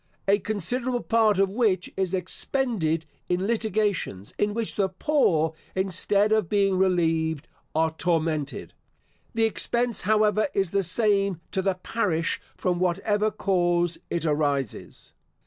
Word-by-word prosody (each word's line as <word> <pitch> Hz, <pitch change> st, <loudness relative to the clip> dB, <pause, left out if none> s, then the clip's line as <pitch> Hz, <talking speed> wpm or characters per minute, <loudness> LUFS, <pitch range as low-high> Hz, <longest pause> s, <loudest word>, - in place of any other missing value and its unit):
A 200 Hz, +1 st, +4 dB
considerable 240 Hz, +5 st, -2 dB
part 220 Hz, -3 st, +3 dB
of 195 Hz, 0 st, +2 dB
which 205 Hz, -5 st, 0 dB
is 190 Hz, -1 st, 0 dB
expended 185 Hz, -, -1 dB, 0.2 s
in 180 Hz, +2 st, 0 dB
litigations, 210 Hz, -, -1 dB
in 205 Hz, 0 st, +2 dB
which 230 Hz, -2 st, -1 dB
the 195 Hz, -2 st, 0 dB
poor, 180 Hz, -, +1 dB, 0.2 s
instead 195 Hz, +2 st, +1 dB
of 215 Hz, -6 st, +2 dB
being 195 Hz, -2 st, +2 dB
relieved, 165 Hz, -5 st, +1 dB, 0.3 s
are 160 Hz, 0 st, +2 dB
tormented. 160 Hz, -4 st, -1 dB, 0.6 s
The 225 Hz, -, +2 dB
expense, 235 Hz, +1 st, +1 dB
however, 215 Hz, +2 st, +2 dB
is 195 Hz, -3 st, +1 dB
the 200 Hz, -, +2 dB
same 195 Hz, -1 st, +1 dB
to 190 Hz, -, 0 dB
the 190 Hz, -1 st, 0 dB
parish 180 Hz, -4 st, -1 dB, 0.2 s
from 180 Hz, -1 st, 0 dB
whatever 205 Hz, +4 st, +1 dB
cause 175 Hz, -4 st, +1 dB
it 170 Hz, -1 st, -2 dB
arises. 145 Hz, -5 st, -2 dB
190 Hz, 130 wpm, -25 LUFS, 170-215 Hz, 0.6 s, A